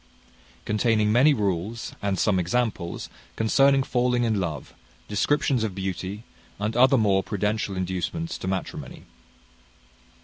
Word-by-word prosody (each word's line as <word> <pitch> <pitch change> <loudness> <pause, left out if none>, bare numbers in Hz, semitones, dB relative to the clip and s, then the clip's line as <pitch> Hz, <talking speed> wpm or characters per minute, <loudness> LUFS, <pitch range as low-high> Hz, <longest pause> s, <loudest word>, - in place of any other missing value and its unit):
Containing 105 0 +2
many 130 +7 +5
rules, 105 - -2
and 100 -2 -1
some 100 -4 +2
examples, 95 -1 -2 0.3
concerning 135 +5 +4
falling 125 -1 +1
in 110 -3 +1
love: 80 -7 -4 0.3
descriptions 125 +3 +1
of 105 -4 -3
beauty, 95 +2 -4 0.3
and 105 +2 -2
other 130 +2 +5
more 100 -4 +3
prudential 105 -1 -2
inducements 95 - -3
to - - -5
matrimony. 95 0 -4
105 Hz, 115 wpm, -25 LUFS, 95-120 Hz, 0.3 s, many